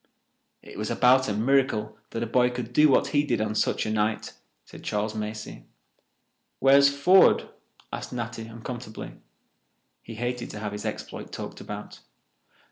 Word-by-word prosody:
"It -, -, -10 dB
was 105 Hz, -, -2 dB
about 130 Hz, 0 st, +4 dB
a -, -, 0 dB
miracle 110 Hz, -2 st, +1 dB
that 115 Hz, -, -3 dB
a -, -, -1 dB
boy 125 Hz, +2 st, +3 dB
could 125 Hz, -1 st, -6 dB
do 150 Hz, +3 st, +6 dB
what 135 Hz, -, +3 dB
he 145 Hz, -1 st, +2 dB
did 145 Hz, -, 0 dB
on 110 Hz, 0 st, -1 dB
such 110 Hz, -, 0 dB
a 110 Hz, -, -2 dB
night," 110 Hz, 0 st, -1 dB, 0.3 s
said -, -, -13 dB
Charles 105 Hz, +1 st, -1 dB
Macey. 105 Hz, 0 st, -6 dB, 0.9 s
"Where's 140 Hz, +1 st, +6 dB
Ford?" 175 Hz, +7 st, +5 dB, 0.5 s
asked -, -, -5 dB
Natty 120 Hz, -2 st, -5 dB
uncomfortably. 115 Hz, 0 st, -7 dB, 0.9 s
He 115 Hz, -, -10 dB
hated 120 Hz, +1 st, -3 dB
to 105 Hz, -, -7 dB
have 105 Hz, -1 st, -4 dB
his 105 Hz, 0 st, -6 dB
exploit -, -, -6 dB
talked -, -, -7 dB
about. -, -, -8 dB
115 Hz, 155 wpm, -26 LUFS, 110-130 Hz, 0.9 s, do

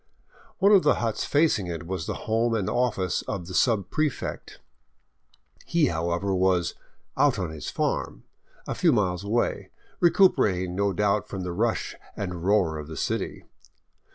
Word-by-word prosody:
One 200 Hz, +2 st, +4 dB
of 200 Hz, -3 st, +7 dB
the -, -, +3 dB
huts 115 Hz, -3 st, -2 dB
facing 145 Hz, -, +2 dB
it 85 Hz, 0 st, -5 dB
was 90 Hz, -2 st, -4 dB
the -, -, -2 dB
home 115 Hz, +1 st, +1 dB
and 105 Hz, -4 st, -1 dB
office 110 Hz, -5 st, 0 dB
of 90 Hz, -3 st, -4 dB
the 90 Hz, -, -8 dB
subprefect. 120 Hz, -, -1 dB, 1.1 s
He, 170 Hz, -4 st, +2 dB
how 85 Hz, +1 st, -2 dB
ever, 95 Hz, +3 st, -1 dB
was 90 Hz, -3 st, +2 dB, 0.2 s
" -, -, -37 dB
out -, -, +3 dB
on 90 Hz, -4 st, -3 dB
his 80 Hz, -1 st, -6 dB
farm -, -, -2 dB, 0.2 s
" -, -, -31 dB
a -, -, -2 dB
few 170 Hz, -, +3 dB
miles 95 Hz, -6 st, 0 dB
away, 110 Hz, +4 st, -1 dB, 0.3 s
recuperating 105 Hz, -, +3 dB
no 100 Hz, +1 st, +1 dB
doubt 105 Hz, +2 st, +1 dB
from 95 Hz, -2 st, -5 dB
the 90 Hz, -1 st, -4 dB
rush 110 Hz, +5 st, -1 dB, 0.2 s
and 90 Hz, -4 st, -4 dB
roar 90 Hz, -6 st, +2 dB
of 75 Hz, -, -7 dB
the 80 Hz, -2 st, -8 dB
city. -, -, -3 dB
100 Hz, 165 wpm, -26 LUFS, 90-115 Hz, 1.1 s, of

